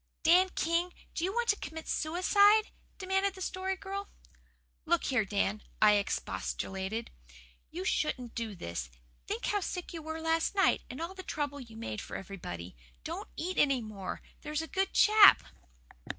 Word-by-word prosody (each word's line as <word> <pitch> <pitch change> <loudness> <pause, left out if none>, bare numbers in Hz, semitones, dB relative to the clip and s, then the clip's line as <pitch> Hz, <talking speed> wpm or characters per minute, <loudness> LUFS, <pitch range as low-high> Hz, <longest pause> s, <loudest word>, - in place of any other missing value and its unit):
"Dan 360 +3 +6
King, 340 +2 0 0.2
do 330 - -3
you 375 - +1
want 475 +2 -1
to 410 - +5
commit 320 -1 -7
suicide?" 405 +6 +4 0.3
demanded 385 0 0
the - - -10
Story 375 +1 -2
Girl. 395 +1 -6 0.7
"Look - - +2
here, 250 -5 +2
Dan," 205 +1 0 0.2
I 215 - +7
expostulated. 190 - -2 0.6
"You 185 - -5
shouldn't 250 -4 -1
do 225 -3 -4
this. 85 - -5 0.4
Think 235 - -3
how 410 - +1
sick 360 -2 -5
you 330 - -5
were 315 +1 -5
last 325 +3 +1
night 390 - +4
and 255 - -7
all 335 +3 -4
the 380 - -8
trouble 290 -5 -3
you 230 -4 -11
made 110 - -4
for - - -6
everybody. 90 - -7 0.3
Don't - - -5
eat 365 +2 -2
any 270 -4 +3
more, 200 -3 -6 0.2
there's 300 +1 -2
a - - -6
good 385 +3 0
chap." 425 -1 +8
315 Hz, 165 wpm, -31 LUFS, -, 0.7 s, chap